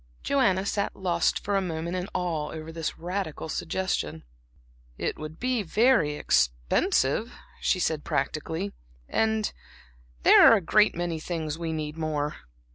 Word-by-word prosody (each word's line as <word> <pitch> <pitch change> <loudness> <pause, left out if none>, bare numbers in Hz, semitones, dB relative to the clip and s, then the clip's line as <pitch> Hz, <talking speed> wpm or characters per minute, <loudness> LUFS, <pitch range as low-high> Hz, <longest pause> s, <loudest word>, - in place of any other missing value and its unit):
Joanna 195 -9 +2
sat 200 0 -1
lost 175 -3 0
for 205 - -1
a 195 - +3
moment 170 -1 -3
in 180 +1 -3
awe 165 -4 -1
over 160 0 -7
this 160 -1 -4
radical 175 -2 -4
suggestion. 160 - -2 0.7
"It - - -3
would 155 +1 -8
be 250 -2 0
very 205 - +3
expensive," - - +1 0.3
she - - +1
said, 160 -4 0
practically 160 +7 -2 0.3
"and 220 -1 0 0.7
there - - +8
are - - +8
a - - +2
great 210 +5 +4
many 170 -1 -2
things 160 -1 -4
we 165 -1 -2
need 155 -1 -4
more." 150 -2 -2
165 Hz, 140 wpm, -27 LUFS, 155-195 Hz, 0.7 s, there